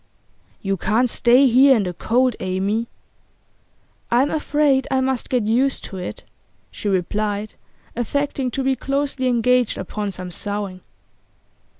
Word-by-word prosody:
'You 195 -1 -1
can't 225 +7 +1
stay 245 +3 +5
here 265 +2 +6
in 215 - +1
the 180 -1 -3
cold, 245 +6 +1
Amy.' 200 +5 -1 1.2
'I'm 255 +4 +2
afraid 295 -3 +1
I 265 -1 +1
must 260 -1 -1
get 250 -3 +1
used 250 +5 +1
to 195 - -7
it,' 180 - -6 0.5
she 205 - -4
replied, 205 +3 -1 0.4
affecting 270 +2 -1
to 270 +3 -3
be 265 0 +2
closely 275 -1 -2
engaged 250 0 +2
upon 205 +2 -4
some 185 -1 -6
sewing. 200 -1 -4
240 Hz, 130 wpm, -21 LUFS, 205-265 Hz, 1.2 s, here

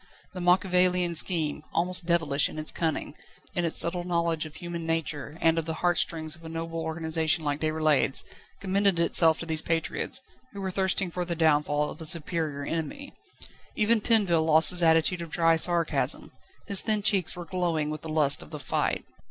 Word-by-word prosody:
The 180 - -6
Machiavelian 180 -1 +2
scheme, 160 -3 0
almost 180 +1 0
devilish 160 -5 +1
in - - -10
its 155 0 -3
cunning, 160 -3 -3 0.4
in 175 - -1
its 165 - -2
subtle 175 +1 +2
knowledge 170 -2 -1
of 155 - -14
human 175 -1 -6
nature 160 -2 -3
and 165 0 +2
of 160 - -4
the 160 -1 -4
heart 175 +1 +1
strings 160 -1 -1
of 165 - -19
a 160 - -8
noble 165 0 -5
organisation 160 0 -1
like 145 -1 -2
Déroulède's, 155 -3 +1 0.4
commended 195 -2 +1
itself 165 -1 +6
to - - -5
these 160 -1 0
patriots, 165 +9 -2 0.3
who 200 - -7
were 190 -1 -3
thirsting 190 -1 -1
for 180 +1 -3
the 175 -1 -4
downfall 150 -2 +1
of - - -12
a - - -4
superior 155 -2 +1
enemy. 165 - -5 0.6
Even 215 +1 +2
Tinville 200 -8 +3
lost 160 0 +5
his 180 -1 +3
attitude 165 +2 +2
of 170 - -7
dry 165 +1 +2
sarcasm; 170 0 0 0.3
his 200 -2 +2
thin 215 -2 0
cheeks 200 -5 +2
were 175 -1 -8
glowing 165 -4 -2
with 155 - -6
the 160 - -8
lust 150 -2 +1
of - - -12
the 155 - -7
fight. 135 - -2
165 Hz, 185 wpm, -26 LUFS, 155-180 Hz, 0.6 s, itself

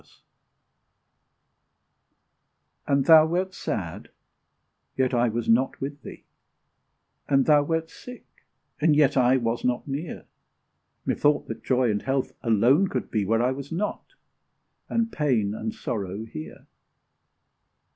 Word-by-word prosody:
And 140 -1 +2
thou 160 -1 +8
wert 185 +3 -1
sad 90 - -5 0.9
yet 130 -1 +1
I 120 0 +2
was 115 +1 -3
not 120 +4 +2
with 140 +1 -6
thee; - - -11 1.1
And 135 -2 +3
thou 150 -1 +5
wert 160 +2 -2
sick, 250 0 -12 0.5
and 155 0 +3
yet 145 -1 +3
I 130 0 +4
was 115 -1 -2
not 125 +2 -1
near; 145 +4 -5 0.8
Methought 145 0 +1
that - - -6
Joy 125 -3 +2
and 105 - -2
Health 135 0 -1
alone 120 - +3
could 130 -8 -4
be 105 -3 0
Where 115 +3 +1
I 125 - +2
was 140 +2 -7
not 200 +6 -4 0.7
and 230 0 0
pain 120 -10 0
and 110 0 -4
sorrow 100 0 -5
here! 75 -8 -9
130 Hz, 125 wpm, -25 LUFS, 115-150 Hz, 1.1 s, thou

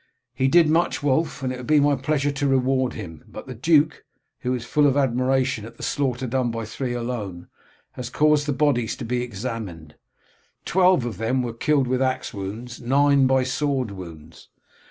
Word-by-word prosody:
"He 130 +1 +1
did 165 +3 +5
much, 160 -1 +1
Wulf, 145 +1 0
and 130 -1 -1
it - - -6
will 125 - -8
be 150 +4 +3
my 145 0 +3
pleasure 145 +1 0
to 140 0 -1
reward 130 -1 +1
him, 80 -8 -8
but - - -9
the 130 - -7
duke, 155 +5 +2 0.4
who 125 0 -1
is 120 -1 -6
full 145 +4 +3
of 140 0 +2
admiration 130 -2 +1
at 115 +1 -11
the - - -9
slaughter 130 -2 -1
done 125 0 0
by 115 -1 -4
three 120 +3 -4
alone, 110 -8 -5 0.4
has 125 -1 -6
caused 150 +2 +2
the - - +1
bodies 130 -5 +1
to 125 - -7
be 120 +1 -1
examined. 105 -9 -6 0.7
Twelve 180 -7 +3
of 115 -6 -5
them 125 +3 0
were 120 -2 -4
killed 140 +3 +1
with 130 +1 0
axe 130 0 -1
wounds, 110 +5 -6
nine 140 +2 +4
by 130 0 +3
sword 130 -2 -1
wounds. 85 -4 -11
130 Hz, 190 wpm, -23 LUFS, 115-140 Hz, 0.7 s, did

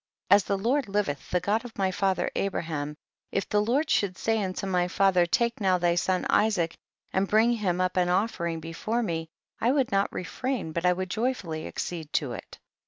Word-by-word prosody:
As 200 0 +7
the 200 - 0
Lord 250 +7 +1
hveth, 195 -10 -2
the 180 - +2
God 205 +5 0
of 245 -2 -10
my 190 -1 +1
father 190 0 0
Abraham, 155 -6 -2 0.3
if 195 - -1
the 210 - +2
Lord 255 +9 +1
should 185 -3 +1
say 225 -2 +1
unto 185 0 -3
my 180 -2 +1
father, 180 -1 +3
take 235 +5 +1
now 185 -2 +3
thy 175 -1 +2
son 185 +1 0
Isaac 205 -6 +2 0.4
and 190 +1 +2
bring 230 +3 +3
liim 180 -4 0
up 185 0 0
an 180 -1 +3
ofl'ering 175 -3 0
before 215 +9 -2
me, 165 -5 -3 0.3
I 235 - +2
woukl 270 -1 +2
not 195 0 +2
re - - -4
frain 255 -4 -3
but 170 +2 0
I 180 - +5
would 185 0 -4
joyfully 205 -10 -2
accede 160 -4 -5
to 140 -5 0
it. - - -9
190 Hz, 200 wpm, -27 LUFS, 175-215 Hz, 0.4 s, As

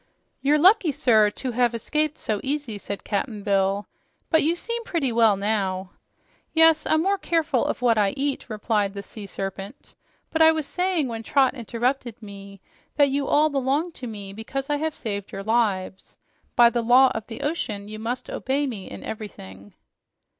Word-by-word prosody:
"You're 290 +2 +3
lucky, 365 +1 +5
sir, 230 -7 +4
to 255 +4 -5
have 240 0 +1
escaped 305 +6 -1
so 210 -2 -2
easy," 270 -6 -3
said 200 0 -6
Cap'n 210 0 -3
Bill. 195 0 +1 0.5
"But 320 -1 +5
you 325 +3 +2
seem 465 +6 -4
pretty 320 - -1
well 225 -3 +4
now." 195 -2 -1 0.6
"Yes, 320 -1 +5
I'm 315 +1 +2
more 395 +1 +1
careful 315 -9 +1
of - - -3
what 230 -3 +4
I 200 -2 +1
eat," 275 -2 -2
replied 210 -2 -1
the 200 - -5
Sea 205 0 -9
Serpent. 195 +5 -7 0.4
"But 320 - 0
I 320 0 +8
was 315 -2 -2
saying 360 -3 0
when 225 -2 -5
Trot 265 +3 +2
interrupted 240 0 -2
me, 200 -2 -11 0.3
that 285 -2 +4
you 275 0 -1
all 305 +1 +3
belong 280 +5 0
to 260 -6 -8
me, 200 -3 -7
because 270 +7 -5
I 290 - +2
have 315 +1 -2
saved 200 -3 -5
your 195 - -6
lives. 200 -4 -1 0.4
By 235 -1 +7
the 240 - 0
law 250 +3 +6
of 220 -1 -5
the 225 - -8
ocean, 215 -10 -3
you 215 0 -8
must 240 +3 -4
obey 275 +3 -1
me 220 -8 -6
in - - -9
everything." 100 - -9
235 Hz, 180 wpm, -24 LUFS, 205-290 Hz, 0.6 s, I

